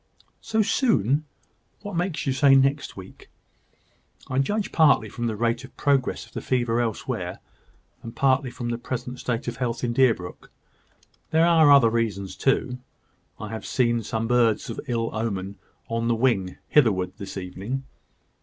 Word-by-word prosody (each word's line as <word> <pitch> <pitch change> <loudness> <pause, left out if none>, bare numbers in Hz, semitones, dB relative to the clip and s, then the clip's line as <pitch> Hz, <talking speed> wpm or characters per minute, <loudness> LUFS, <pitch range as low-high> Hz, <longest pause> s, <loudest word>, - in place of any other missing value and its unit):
"So 220 -1 +1
soon? 150 - +1 0.6
What 205 -3 -6
makes 175 -1 -2
you 135 - +1
say 135 0 +5
next 135 -1 +1
week?" 95 0 -12 1.0
"I 130 - 0
judge 205 +9 -1
partly 145 -9 +4
from 120 +2 -3
the 110 - -2
rate 115 +3 0
of 130 - -14
progress 140 -3 +1
of - - -21
the - - -4
fever 120 -2 0
elsewhere, 115 -3 -3 0.6
and 115 +1 -9
partly 135 +1 +2
from 120 0 -5
the 120 0 -2
present 125 0 -5
state 120 -1 -3
of 120 -1 -4
health 120 -2 -2
in 120 -1 0
Deerbrook. 115 -9 0 0.8
There 160 +1 +4
are 160 -3 +6
other 130 -5 +6
reasons 105 -5 -2
too. 130 -2 0 0.6
I 105 0 -6
have 110 0 -6
seen 120 -2 +1
some 110 +1 -3
birds 115 -3 +2
of - - -6
ill 115 -2 -1
omen 100 -3 -3 0.3
on 115 0 -2
the 120 - +2
wing 110 -7 0
hitherward 95 -10 +3
this 100 -1 -7
evening." 95 +8 -5
120 Hz, 160 wpm, -24 LUFS, 115-135 Hz, 1.0 s, are